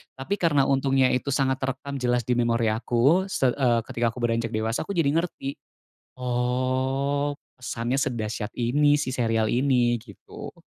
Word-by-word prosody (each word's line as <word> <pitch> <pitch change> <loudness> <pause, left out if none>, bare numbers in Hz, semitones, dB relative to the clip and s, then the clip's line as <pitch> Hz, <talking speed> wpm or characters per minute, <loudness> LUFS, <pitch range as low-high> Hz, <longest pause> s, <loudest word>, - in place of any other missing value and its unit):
tapi 185 +10 -3
karena 150 -5 +3
untungnya 135 -1 +2
itu 125 - -1
sangat 135 -1 +1
terekam 135 +1 -4
jelas 125 -1 +1
di 125 - +1
memori 115 -2 +2
aku 125 - +2
se 135 -9 +1
eee, 120 -3 +2
ketika 115 -1 -1
aku 125 - -7
beranjak 115 -1 0
dewasa 115 +6 -1
aku 200 - -4
jadi 150 -4 +2
ngerti. 160 -4 -2 0.6
"Oh, 130 +3 0 0.3
pesannya 120 +1 -2
sedahsyat 115 -4 -3
ini, 145 +5 +3
si 130 - -2
serial 115 -3 +1
ini." 125 -2 +2
Gitu. 100 -6 -11
130 Hz, 150 wpm, -25 LUFS, 120-140 Hz, 0.6 s, karena